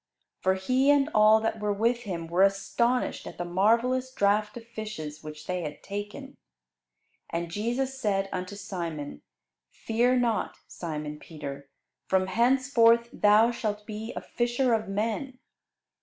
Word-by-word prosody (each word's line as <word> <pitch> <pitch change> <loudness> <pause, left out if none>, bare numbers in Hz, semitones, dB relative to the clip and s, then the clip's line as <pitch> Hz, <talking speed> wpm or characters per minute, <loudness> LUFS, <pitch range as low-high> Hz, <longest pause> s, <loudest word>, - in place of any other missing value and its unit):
For 190 0 +2
he 255 +9 +2
and 290 +1 +4
all 215 +1 +6
that 220 0 -1
were 210 0 0
with 230 +4 +1
him 170 -4 -4
were 170 +3 0
astonished 195 +6 +1
at - - -9
the 175 - -3
marvellous 235 +8 +2
draught 210 0 +1
of 230 - -10
fishes 210 -10 -7
which 150 0 -9
they 180 -1 -2
had 150 -3 -7
taken. 205 +1 -6 0.9
And 170 0 -3
Jesus 245 +7 -2
said 195 -4 0
unto 185 +2 -4
Simon, 170 -7 -5 0.5
"Fear 240 +3 +1
not, 235 -3 0
Simon 150 -3 -5
Peter; 140 -4 -8 0.4
from 190 0 +2
henceforth 235 +2 +3
thou 215 +3 +5
shalt 210 -3 -3
be 220 +1 -6
a - - -4
fisher 240 +1 0
of 220 -1 0
men." 225 +6 -2
210 Hz, 140 wpm, -28 LUFS, 185-235 Hz, 0.9 s, all